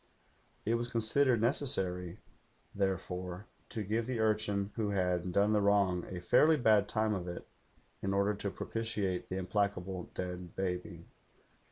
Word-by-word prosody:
It 110 Hz, -, +1 dB
was 120 Hz, +1 st, -1 dB
considered 120 Hz, +1 st, +2 dB
necessary, 95 Hz, -9 st, +1 dB, 0.6 s
therefore, 90 Hz, -1 st, -2 dB, 0.2 s
to 110 Hz, -, -3 dB
give 110 Hz, +3 st, -1 dB
the 125 Hz, -3 st, -2 dB
urchin 105 Hz, -2 st, +1 dB
who 110 Hz, -3 st, -1 dB
had 90 Hz, -2 st, 0 dB
done 100 Hz, +4 st, +3 dB
the 105 Hz, -, +3 dB
wrong 100 Hz, -3 st, +2 dB
a 90 Hz, -, -5 dB
fairly 155 Hz, -, +5 dB
bad 110 Hz, -5 st, +4 dB
time 110 Hz, 0 st, +1 dB
of 90 Hz, -3 st, -3 dB
it 90 Hz, -, -6 dB, 0.5 s
in 95 Hz, -, -1 dB
order 100 Hz, +1 st, +2 dB
to 100 Hz, 0 st, -3 dB
propitiate 105 Hz, -4 st, -3 dB
the 95 Hz, -, -3 dB
implacable 95 Hz, -1 st, -2 dB
dead 90 Hz, -1 st, -5 dB
baby. 90 Hz, -2 st, -3 dB
100 Hz, 145 wpm, -33 LUFS, 90-110 Hz, 0.6 s, fairly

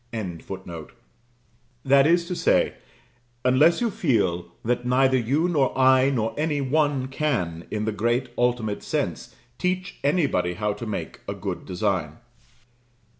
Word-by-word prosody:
] -, -, -38 dB, 1.7 s
That 135 Hz, +1 st, +5 dB
is 170 Hz, +1 st, +3 dB
to 180 Hz, -, -4 dB
say, -, -, +2 dB, 0.7 s
unless 145 Hz, -, +4 dB
you 235 Hz, -2 st, +1 dB
feel 95 Hz, -, 0 dB, 0.2 s
that 120 Hz, +1 st, 0 dB
neither 130 Hz, +2 st, +3 dB
you 135 Hz, +8 st, +1 dB
nor 145 Hz, -8 st, +1 dB
I, 130 Hz, 0 st, +5 dB
nor 115 Hz, -5 st, -1 dB
any 150 Hz, -1 st, 0 dB
one, 140 Hz, -1 st, +1 dB
can, 120 Hz, -, -2 dB
in 105 Hz, 0 st, -2 dB
the 110 Hz, -, 0 dB
great 120 Hz, +4 st, 0 dB
ultimate 120 Hz, -4 st, 0 dB
sense, -, -, -3 dB, 0.2 s
teach 185 Hz, +1 st, -2 dB
anybody 140 Hz, -, +1 dB
how 105 Hz, +2 st, -1 dB
to 110 Hz, +3 st, -7 dB
make 105 Hz, -, -5 dB
a -, -, -3 dB
good -, -, -5 dB
design. 90 Hz, -5 st, -1 dB
130 Hz, 135 wpm, -24 LUFS, 110-145 Hz, 1.7 s, That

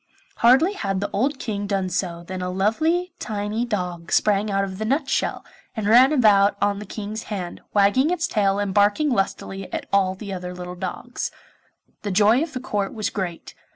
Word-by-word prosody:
Hardly 265 Hz, -, +5 dB
had 195 Hz, -, -2 dB
the 200 Hz, -, -3 dB
old 265 Hz, +7 st, +1 dB
King 205 Hz, -5 st, -3 dB
done 195 Hz, -2 st, -1 dB
so 170 Hz, -2 st, -2 dB
than 185 Hz, +1 st, -6 dB
a 180 Hz, -, -2 dB
lovely 315 Hz, -, 0 dB
tiny 215 Hz, +2 st, -2 dB
dog 180 Hz, -6 st, -4 dB
sprang 210 Hz, 0 st, +2 dB
out 195 Hz, 0 st, +1 dB
of 190 Hz, 0 st, -5 dB
the -, -, -1 dB
nutshell, 270 Hz, +5 st, 0 dB, 0.3 s
and 220 Hz, -, -2 dB
ran 245 Hz, +6 st, +6 dB
about 210 Hz, -7 st, +4 dB
on 205 Hz, 0 st, +1 dB
the 210 Hz, -, -8 dB
King's 215 Hz, +2 st, -6 dB
hand, 185 Hz, -5 st, -5 dB
wagging 205 Hz, +9 st, +4 dB
its 350 Hz, -2 st, 0 dB
tail 200 Hz, -6 st, +1 dB
and 205 Hz, -1 st, -1 dB
barking 205 Hz, +9 st, +3 dB
lustily 195 Hz, -3 st, -2 dB
at -, -, -4 dB
all 190 Hz, -1 st, +3 dB
the 200 Hz, +1 st, -7 dB
other 180 Hz, -1 st, -6 dB
little 180 Hz, 0 st, -7 dB
dogs. 190 Hz, +7 st, -4 dB, 0.7 s
The 205 Hz, -, -3 dB
joy 210 Hz, +6 st, +4 dB
of 320 Hz, -1 st, -3 dB
the 255 Hz, -, -3 dB
Court 205 Hz, -5 st, -2 dB
was 215 Hz, -1 st, -2 dB
great. 180 Hz, -4 st, -5 dB
205 Hz, 190 wpm, -23 LUFS, 190-235 Hz, 0.7 s, ran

